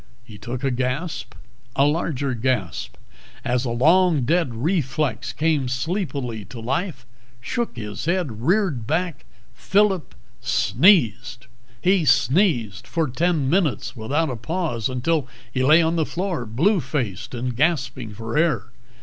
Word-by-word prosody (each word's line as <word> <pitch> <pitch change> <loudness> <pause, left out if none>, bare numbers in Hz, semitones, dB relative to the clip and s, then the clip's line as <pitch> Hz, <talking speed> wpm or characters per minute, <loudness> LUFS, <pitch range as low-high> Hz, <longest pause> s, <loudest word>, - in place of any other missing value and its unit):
He 110 -4 -13
took 120 +5 -5
a 135 - +1
gasp, 130 +7 -3 0.4
a 140 - +4
larger 145 -3 0
gasp, 110 - -2 0.5
as 125 +1 0
a - - -1
long 160 +5 +4
dead 150 -2 +1
reflex 130 - -1
came 150 0 +1
sleepily 130 - -2
to 125 - -9
life, 135 - -3 0.3
shook 235 - -3
its 105 0 -5
head, 165 - -1
reared 165 - +1
back... 165 -2 -1 0.3
Phillip 195 -3 +1 0.3
sneezed. 120 - +3 0.4
He 185 -1 +4
sneezed 130 - +2
for 165 -2 0
ten 155 +2 0
minutes 160 -3 0
without 140 +7 -1
a - - -3
pause, 120 - -2
until 135 +3 0 0.3
he 130 - 0
lay 155 +5 +6
on 165 +1 +1
the 160 - +2
floor 175 - -3
blue 170 - +2
faced 130 - -3
and 120 0 -3
gasping 130 -6 0
for 110 +3 -6
air. 150 -7 +1
135 Hz, 135 wpm, -23 LUFS, 120-170 Hz, 0.5 s, lay